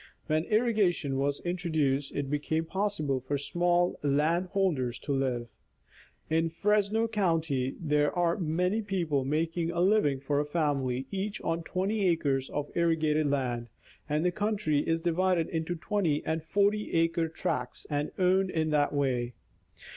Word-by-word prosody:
When 155 +1 0
irrigation 205 - +1
was 140 +1 0
introduced 160 -6 -1
it 145 -1 -2
became 150 +3 -1
possible 160 -8 -1
for 130 +3 -2
small 175 +4 +1
land 155 +5 +1
holders 160 - 0
to 145 - -5
live. 130 -3 -1 0.8
In 165 +1 +1
Fresno 210 +5 +1
county, 165 - 0
there 150 -2 +2
are 170 -1 +2
many 180 +6 0
people 170 -9 -1
making 165 +4 -1
a 170 0 -2
living 180 -8 +3
for 140 +1 0
a 145 - 0
family, 140 -5 0
each 200 +2 -3
on 165 0 -1
20 200 +3 -1
acres 145 -6 +1
of 145 0 -4
irrigated 155 -3 +2
land, 125 -4 -1 0.4
and 150 +3 +1
the 180 - +3
country 205 -6 0
is 165 +2 0
divided 175 0 +1
into 165 +1 -2
20 170 -4 -1
and 160 0 -1
40 205 +4 +1
acre 165 0 +2
tracts 160 - -3
and 145 0 -1
owned 185 +1 +3
in 160 -3 0
that 145 -1 +2
way. 125 -4 0
160 Hz, 145 wpm, -29 LUFS, 145-180 Hz, 0.8 s, living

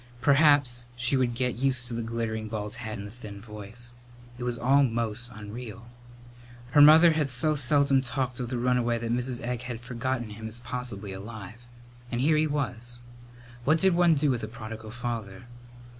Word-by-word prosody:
Perhaps 140 -3 +4
she 120 +3 +2
would 125 -2 +1
get 125 -1 -1
used 130 -1 0
to 120 - -3
the 115 - -2
glittering 115 -1 -3
bald 105 -1 -4
head 110 -3 -5
and 100 - -7
the 105 - -8
thin 105 -4 -9
voice. 105 +3 -9 0.5
It - - -4
was 120 -1 -1
all 135 +4 +4
most 115 -1 0
unreal. 115 +1 -9 0.8
Her 145 - +6
mother 160 +3 +9
had 155 -3 0
so 130 +5 +2
seldom 140 -2 +3
talked 130 -1 -2
of 125 -2 -3
the 125 - -2
runaway 120 -1 +1
that 115 0 -3
Mrs. 125 0 -2
Egg 120 0 -3
had 125 -2 -5
forgotten 120 -1 -3
him 110 +1 -7
as 110 +1 -7
possibly 120 -6 -5
alive. 105 +2 -8 0.5
And 120 - -1
here 150 +5 +3
he 155 +1 +3
was! 120 -5 -3 0.6
What 155 +6 +4
did 190 +2 +3
one 170 -1 +5
do 145 -1 +2
with 120 -2 -1
a - - -2
prodigal 110 -1 -8
father? 115 -3 -5
120 Hz, 185 wpm, -27 LUFS, 115-130 Hz, 0.8 s, mother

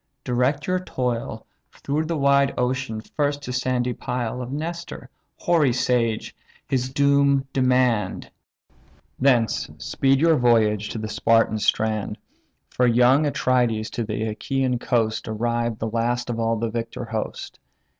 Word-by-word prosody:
Direct 130 +4 0
your 185 0 0
toil 125 -9 -3 0.3
Through 150 +3 -2
the 165 0 -2
wide 140 -1 +3
ocean 125 -3 -1
first 145 +4 -2
to 125 - -5
sandy 125 -1 0
Pyle; 125 -1 -3
Of 125 +1 -6
Nestor, 165 +4 -6 0.3
hoary 155 -7 +2
sage, 120 -3 0 0.3
his 130 -1 -1
doom 140 0 +3
demand: 125 -6 +1 0.9
Thence 125 -5 +2
speed 135 0 +1
your 165 0 +4
voyage 110 -4 +2
to - - -5
the 110 0 -4
Spartan 115 0 +2
strand; 110 0 0 0.5
For 125 - +2
young 125 +5 +4
Atrides 120 -6 0
to 120 - -2
the 110 0 -3
Achaian 125 +3 -1
coast 115 -2 0
Arrived 115 +1 -1
the 115 - -3
last 120 +2 -1
of 115 - -4
all 115 0 +1
the 115 0 -2
victor 115 +1 -4
host. 110 -1 -5
125 Hz, 135 wpm, -23 LUFS, 115-135 Hz, 0.9 s, your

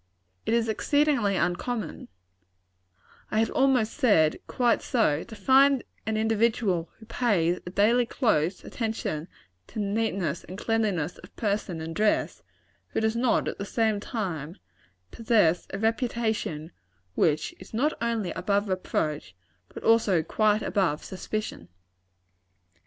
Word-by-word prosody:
It 225 - +3
is 230 -1 +1
exceedingly 275 -2 +2
uncommon 190 +2 -2 1.2
I - - -1
had 225 0 +2
almost 260 -5 +2
said, 200 - +3
quite 240 -2 +2
so 215 - +1
to 225 - -11
find 265 +5 +4 0.2
an 220 0 0
individual 220 -5 +1
who 220 - -14
pays 200 -7 +1
a - - -2
daily 230 +6 +3
close 185 - 0
attention 220 -9 -3 0.4
to - - -7
neatness 200 -6 -1
and 185 - -9
cleanliness 205 -8 -1
of 180 - -15
person 200 -6 -2
and 165 +1 -6
dress, 215 0 +1 0.5
who - - -2
does 220 0 +1
not, 240 +1 +2
at - - -4
the - - -2
same 220 0 0
time, 180 - -4 0.6
possess 215 -7 +2
a 195 - -4
reputation 220 -7 -1 0.4
which 155 - +1
is 185 - -13
not 275 +8 +1
only 230 -5 -1
above 200 +2 0
reproach, 155 - -2 0.3
but - - -10
also 220 -7 +4
quite 215 +5 +2
above 180 -8 0
suspicion. 190 - -5
215 Hz, 130 wpm, -27 LUFS, 180-230 Hz, 1.2 s, find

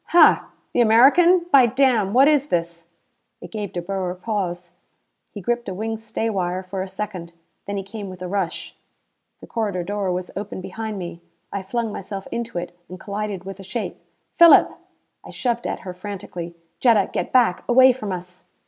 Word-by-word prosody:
"Hah! 345 - +5 0.3
The 245 - +3
American. 290 +11 +6
By 260 -3 +7
damn, 240 -5 +2
what 260 +5 +6
is 295 -2 +3
this?" 170 - -2 0.5
It - - -11
gave 210 -3 -4
De 175 - -4
Boer 185 -1 -3
pause. 180 -4 -3 0.6
He 205 - -9
gripped 240 +2 -1
a 190 - -5
wing 220 +2 -3
stay 225 0 -3
wire 185 -3 -1
for 190 +1 -5
a 190 - -4
second. 185 -3 -6 0.3
Then 200 0 -3
he 195 - -3
came 200 0 -7
with 185 -1 -9
a - - -4
rush. 190 -2 -3 0.7
The - - -9
corridor 205 -6 -2
door 200 0 -2
was 180 0 -4
open 200 0 -5
behind 215 +3 -5
me. 175 -2 -7 0.3
I 200 - -2
flung 225 +3 -2
myself 195 0 -6
into 235 -4 -4
it 175 0 -5
and 185 0 -9
collided 200 -2 -4
with 195 0 -8
a - - -9
shape. 215 +4 -5 0.4
"Philip!" 340 -1 +8 0.5
I - - -12
shoved 240 -2 -2
at - - -4
her 185 - -7
frantically. 180 -3 -7 0.2
"Jetta, 225 -6 +4
get - - -2
back! 240 -8 +3
Away 260 +1 +7
from 215 -5 -5
us!" 180 0 -7
200 Hz, 185 wpm, -22 LUFS, 185-230 Hz, 0.7 s, Philip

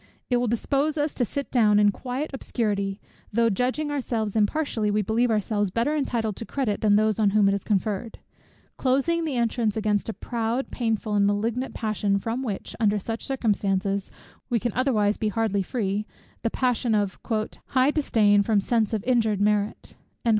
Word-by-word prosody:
It 245 - +4
will 245 0 0
dispose 280 +7 0
us 295 0 0
to 250 - 0
sit 280 +5 -4
down 215 -4 +4
in 205 0 +5
quiet 260 +8 -4
obscurity, 205 -6 -2 0.3
though, 230 +1 +3
judging 255 +8 -1
ourselves 230 -7 -2
impartially, 220 0 +1
we 210 +1 +1
believe 230 +4 +1
ourselves 210 -2 0
better 235 +10 0
entitled 230 -7 -1
to - - -4
credit, 250 -7 -1
than 210 -2 +4
those 215 0 +2
on 210 -2 +4
whom 205 0 +4
it 195 - +3
is 200 - -2
conferred; 210 +1 -1 0.6
closing 275 +6 +1
the 295 -4 -2
entrance 230 -2 0
against 210 0 0
a - - -2
proud, 235 +3 -2
painful, 225 -3 -1
and 200 -1 +3
malignant 225 +5 -1
passion, 210 -3 0
from 230 +5 -3
which, 215 -7 -5
under 210 -2 +3
such 225 +3 -4
circumstances, 200 -6 0 0.4
we 240 -2 +2
can 240 -1 -2
otherwise 215 -6 +1
be 215 - -1
hardly 210 -2 0
free, 205 0 -2 0.3
the 230 - 0
passion 245 -2 +1
of 205 -2 -1 0.5
"high 260 +2 +3
disdain 215 -9 +3
from 210 0 +2
sense 225 +1 +1
of 210 - -3
injured 225 -5 +2
merit." 210 0 0
220 Hz, 175 wpm, -25 LUFS, 205-250 Hz, 0.6 s, in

